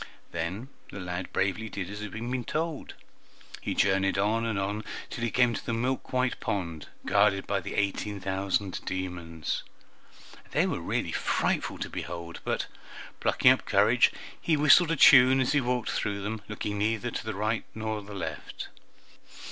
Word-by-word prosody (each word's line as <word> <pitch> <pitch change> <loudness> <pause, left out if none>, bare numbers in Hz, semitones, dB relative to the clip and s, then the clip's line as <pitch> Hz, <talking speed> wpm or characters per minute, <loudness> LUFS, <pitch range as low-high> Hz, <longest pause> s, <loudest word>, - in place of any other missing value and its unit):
Then 90 +10 -3 0.2
the 100 - -7
lad 90 0 -4
bravely 105 +3 0
did 95 -4 -4
as 105 - -6
he 105 - -4
had 105 - -8
been 120 +3 -3
told. 155 +3 -3 0.7
He - - -2
journeyed 95 0 +2
on 110 +4 +1
and 110 -3 -1
on 100 +2 -2 0.3
till 115 - -4
he 120 - +1
came 125 +1 +3
to - - -3
a 115 - +1
milk 125 +3 -2
white 130 0 +1
pond, 85 -7 -3 0.2
guarded 100 -1 +3
by - - 0
the - - -6
eighteen 100 0 -1
thousand 95 0 -1
demons. 90 -4 -3 0.9
They - - +3
were - - -2
really - - -1
frightful - - 0
to - - -3
behold, 85 -1 -6
but, - - -1 0.5
plucking - - +5
up - - +1
courage, - - +4 0.3
he 160 -2 +2
whistled 150 +3 +6
a 165 - +2
tune 130 -2 +8
as 130 - +2
he 145 -1 +3
walked 125 -1 -1
through 100 -1 -2
them, 110 +1 -3
looking 105 -1 -3
neither 110 +3 0
to - - -4
the 110 -2 -4
right 110 +3 -1
nor 110 -1 -3
the 100 0 -9
left. 80 -6 -6
105 Hz, 170 wpm, -28 LUFS, 95-120 Hz, 0.9 s, tune